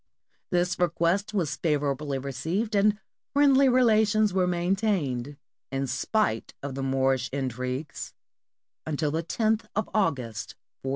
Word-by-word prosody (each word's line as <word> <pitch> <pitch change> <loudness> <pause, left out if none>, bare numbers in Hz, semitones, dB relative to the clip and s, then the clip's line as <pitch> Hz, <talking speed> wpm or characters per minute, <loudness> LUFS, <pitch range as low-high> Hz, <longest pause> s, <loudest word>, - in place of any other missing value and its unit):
This 175 -1 +1
request 175 +4 +1
was 180 -9 -1
favorably 145 -2 0
received, 160 - -2
and 205 +1 +3 0.4
friendly 275 -1 +6
rela 235 -4 +4
tions 215 -1 +2
were 185 -1 +2
maintained, 175 - 0 0.3
in 135 0 -1
spite 135 - -1
of 140 -1 -4
the 135 - -4
Moorish 135 -1 +1
intrigues, 130 +1 -4 0.7
until 150 -1 -1
the 160 +2 0
lothof 220 +5 0 0.3
August, 130 - -1 0.3
1498. 135 - -4
165 Hz, 120 wpm, -27 LUFS, 135-210 Hz, 0.7 s, friendly